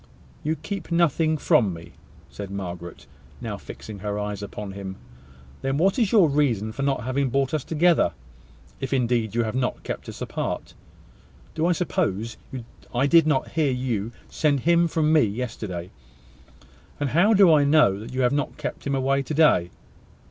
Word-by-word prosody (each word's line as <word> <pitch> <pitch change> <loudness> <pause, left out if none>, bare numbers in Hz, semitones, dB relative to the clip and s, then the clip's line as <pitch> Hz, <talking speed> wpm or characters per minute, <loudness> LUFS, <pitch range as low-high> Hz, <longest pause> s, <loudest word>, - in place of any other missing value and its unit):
"You 155 +1 0
keep 195 0 -6
nothing 160 -2 +2
from 105 - +3
me!" 85 0 -11 0.4
said 100 -2 -7
Margaret, 90 -3 -7 0.3
now - - -4
fixing 105 -2 -9
her 105 +1 -3
eyes 105 -1 -3
upon 100 0 -6
him. 95 -1 -6 0.7
"Then 135 +1 -1
what 190 - +2
is 220 -5 +2
your 205 -7 +6
reason 130 -8 +1
for 130 - -6
not 140 -4 0
having 130 +2 0
brought 135 +2 0
us 155 -4 0
together, 165 - +3 0.7
if 135 0 -3
indeed 120 -4 +1
you 120 - +2
have 110 - -3
not 125 0 -2
kept - - -5
us - - -9
apart? - - -4 0.8
Do 160 - 0
you 175 - +3
suppose 115 - -1 0.5
I 125 +3 +1
did 165 +2 +5
not 145 -4 +1
hear 155 -3 +1
you 120 -4 -2 0.2
send 145 -4 +1
him 170 +2 +4
from 155 -1 +1
me 155 - +6
yesterday? 105 -5 -3 1.1
And 145 -2 0
how 200 +8 +4
do 190 -4 +7
I 150 -2 +5
know 140 -10 +4
that 110 - -8
you 130 +1 -1
have 125 +1 +3
not 145 -1 -2
kept - - -5
him 140 - 0
away 135 +1 +1
to 135 - -5
day?" 145 - +4
135 Hz, 175 wpm, -24 LUFS, 105-155 Hz, 1.1 s, do